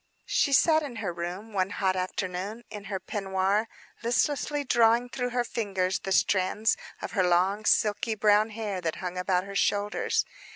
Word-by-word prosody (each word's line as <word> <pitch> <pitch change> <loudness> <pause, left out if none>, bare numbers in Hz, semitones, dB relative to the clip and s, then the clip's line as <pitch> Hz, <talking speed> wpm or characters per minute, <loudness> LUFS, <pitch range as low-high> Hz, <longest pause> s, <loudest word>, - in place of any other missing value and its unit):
She 280 - +1
sat 315 +3 +5
in 280 -5 -6
her 200 -6 -3
room, 180 +6 -6
one 190 -1 +1
hot 190 -2 0
afternoon, 185 +4 -3
in 210 -2 -8
her 195 -2 -3
peignoir, 195 +2 -1 0.3
listlessly 290 +4 0
drawing 235 -1 +3
through 245 0 -2
her 245 0 0
fingers 195 -5 -1
the 195 - -5
strands 190 +3 +2 0.3
of - - -4
her 195 - +1
long, 185 +4 +2
silky 220 +1 +2
brown 210 +1 +4
hair 210 -4 -4
that 165 -2 -2
hung 180 -1 -5
about 180 0 +1
her 200 +1 -8
shoulders. 205 +1 +1
205 Hz, 165 wpm, -27 LUFS, 185-225 Hz, 0.3 s, sat